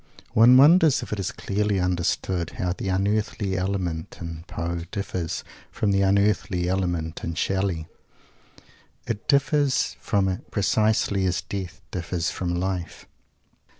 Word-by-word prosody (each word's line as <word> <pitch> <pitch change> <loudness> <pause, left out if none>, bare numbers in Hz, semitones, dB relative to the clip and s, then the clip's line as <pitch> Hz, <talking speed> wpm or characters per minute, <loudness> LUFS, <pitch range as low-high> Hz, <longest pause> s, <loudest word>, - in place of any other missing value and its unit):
One 120 +3 +7
wonders 155 +1 +6
if - - -5
it 105 - -3
is 95 - -2
clearly 105 0 -1
understood 90 -1 -1
how 90 -1 0
the 95 - -4
"unearthly" 100 0 0
element 90 -4 -2
in 85 -1 -7
Poe 85 +1 -3
differs 90 -4 -3 0.3
from 105 - 0
the 100 0 +2
"unearthly" 100 -2 +2
element 90 -3 -2
in 85 - -3
Shelley. 95 -3 -1 1.2
It 115 -3 -4
differs 140 -1 +2
from 100 -3 +1
it 95 +6 -4
precisely 105 -2 +1
as 90 0 0
Death 95 -2 -6
differs 85 -1 -2
from 90 -1 -2
Life. 90 -2 -3
95 Hz, 130 wpm, -25 LUFS, 90-105 Hz, 1.2 s, One